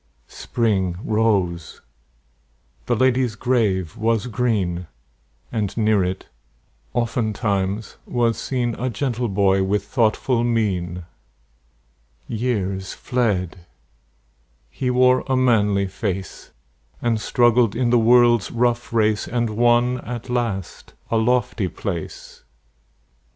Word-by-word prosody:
Spring 95 - -1
rose; 100 -7 0 1.1
the - - +2
lady's 125 -1 +2
grave 105 -8 0
was 115 -1 0
green; 100 -7 -1 0.6
And 105 -3 -2
near 110 -3 +3
it, 90 +1 -4 0.7
oftentimes, 105 -3 -1
was 120 -2 +1
seen 125 -3 -2
A 130 +2 -1
gentle 120 +1 -2
boy 95 -1 +2
with 100 +1 0
thoughtful 115 +2 +1
mien. 90 -7 -1 1.2
Years 100 -5 -2
fled; 100 -8 -1 1.1
he 125 - -2
wore 125 0 +4
a 130 -1 +1
manly 105 -6 +2
face, 95 -1 -5 0.5
And 115 -2 0
struggled 120 -1 +3
in 120 0 +1
the 120 - +5
world's 120 -1 +4
rough 120 0 0
race, 110 -2 +1
And 120 -2 -1
won 120 +2 +2
at 120 0 -7
last 115 -7 -3 0.2
a 115 - +2
lofty 115 -3 +1
place. 85 -1 -6
115 Hz, 105 wpm, -22 LUFS, 100-120 Hz, 1.2 s, the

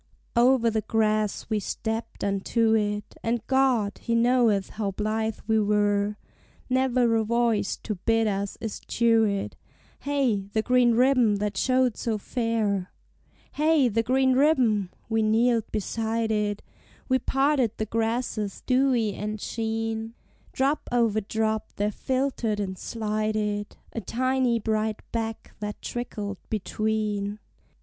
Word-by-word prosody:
Over 240 -1 +4
the 220 0 0
grass 215 -1 0
we 215 -1 0
stepped 225 +3 -4
unto 220 +3 +1
it, 210 -1 -1
And 230 -1 -1
God, 255 -7 +2
He 235 - -1
knoweth 230 -4 +3
how 210 -2 -2
blithe 215 +2 -2
we 220 0 +2
were! 205 0 +1 0.5
Never 255 -2 +3
a 220 - +1
voice 230 -2 +1
to 215 - -2
bid 225 +4 +1
us 200 -1 -2
eschew 230 0 +1
it; 200 -1 -2 0.4
Hey 260 -9 0
the 220 - +1
green 250 -1 +4
ribbon 250 -3 +4
that 205 0 -2
showed 255 +2 +2
so 225 -2 -1
fair! 215 -4 -1 0.6
Hey 305 -3 +3
the 225 +1 +1
green 260 +2 +2
ribbon! 255 - +3 0.2
we 225 -1 +1
kneeled 225 +1 +2
beside 225 +2 -1
it, 210 -1 -1 0.4
We 260 -1 +2
parted 270 -3 +1
the 215 - -1
grasses 225 -1 -2
dewy 255 -5 +2
and 210 +2 -4
sheen: 225 +1 -3 0.4
Drop 275 +3 0
over 230 -3 +2
drop 220 +1 -2
there 205 +1 0
filtered 255 -3 -1
and 190 -2 -3
slided 215 -1 -2 0.2
A 230 - -3
tiny 255 +3 +1
bright 215 -1 -1
beck 225 -1 -4
that 210 0 -5
trickled 210 -5 -5
between. 215 -1 -1
225 Hz, 130 wpm, -26 LUFS, 210-240 Hz, 0.6 s, Over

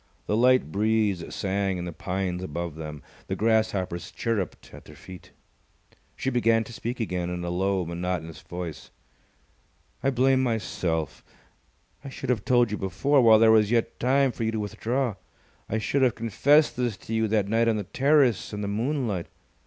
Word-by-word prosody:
The 105 - 0
light 125 -7 +3
breeze 105 -3 +1
sang 95 -1 -1
in 85 - -4
the 85 - -6
pines 90 +1 -3
above 85 -1 -4
them. 75 -1 -8 0.2
The - - -2
grasshoppers 105 -6 0
chirrupped 105 -7 -3
at - - -12
their - - -13
feet. 90 -2 -12 0.9
She 135 - -2
began 115 -2 +3
to 115 - -11
speak 120 +2 -5
again 90 -5 -2
in 90 0 -4
a 85 - -3
low, 95 +1 0
monotonous 85 -2 -4
voice. 85 -3 -7 1.1
"I 135 - +2
blame 130 0 +3
myself! 90 - -2 0.8
I 140 - -7
should 130 -1 -3
have 110 -5 -1
told 120 -3 +3
you 105 - -2
before, 135 - +2
while 110 -2 +7
there 110 0 +6
was 110 -2 +4
yet 115 -1 0
time 135 +2 +3
for 115 - -5
you 110 - +1
to 110 - -1
withdraw. 110 +2 -2 0.5
I 110 - 0
should 135 +5 0
have 125 -3 +3
confessed 140 +7 +3
this 120 -5 -1
to 115 - -8
you 110 0 +1
that 105 -2 +1
night 115 +2 +2
on 110 -1 +2
the 105 - -2
terrace 135 - +2
in 105 - -4
the 100 - -2
moonlight. 110 - -2
110 Hz, 175 wpm, -26 LUFS, 90-120 Hz, 1.1 s, while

